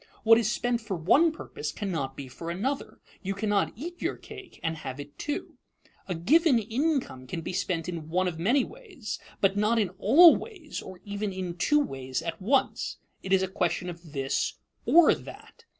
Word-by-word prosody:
What 225 +1 +7
is 220 -1 +1
spent 245 0 0
for 210 -4 -4
one 280 - +4
purpose 150 - -6
cannot 160 -10 -3
be 140 - -6
for 165 +6 -7
another; 245 +11 -3 0.2
"you 195 0 -3
cannot 205 -1 +1
eat 345 - -7
your - - -1
cake 395 -4 -12
and 165 0 -1
have 135 -2 -6
it 145 0 -9
too." 295 - -4 0.5
A 180 - -2
given 285 - +4
income 230 - -1
can 170 +3 -4
be 175 - -5
spent 175 -3 -1
in 165 -3 -5
one 185 +3 +1
of 165 -3 -4
many 245 +10 +3
ways, 370 - -7 0.2
but 195 0 +3
not 210 +3 +2
in 210 -5 +2
all 315 - +8
ways 370 -10 -7
or 185 -1 -10
even 205 0 -3
in 185 -2 -4
two 295 +12 +3
ways 135 - -3
at 165 0 -5
once. 260 +8 +1 0.2
It 190 - -6
is 190 -1 +4
a - - 0
question 180 -1 -1
of 170 -3 -13
this 135 -1 -1 0.3
or 340 -1 +7
that. 470 - -11
195 Hz, 190 wpm, -28 LUFS, 170-270 Hz, 0.5 s, all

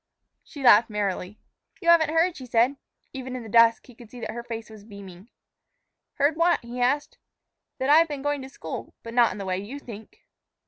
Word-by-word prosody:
She 285 - -10
laughed 225 -2 +6
merrily. 205 -1 -3 0.4
"You 340 -3 -1
haven't 330 -2 +5
heard," 330 +2 +2
she 260 -3 -10
said. 240 +3 +2 0.4
Even 260 -1 -6
in 250 - -6
the 220 - -10
dusk 230 0 +4
he 250 - -16
could 235 -1 -15
see 245 - -11
that - - -4
her 235 - -6
face 230 -1 -7
was 215 -2 -13
beaming. 200 -1 -13 0.9
"Heard 290 +2 +1
what?" 340 +1 +3
he 240 +1 -7
asked. 280 +4 0 0.6
"That 265 0 0
I've 325 +2 +6
been 290 -3 -6
going 290 -1 -1
to 265 - -9
school, - - -8
but 230 - -8
not 240 -1 +4
in - - -7
the 200 - -6
way 185 0 -2
you 215 +8 -7
think." 220 -6 -12
245 Hz, 210 wpm, -25 LUFS, 220-285 Hz, 0.9 s, laughed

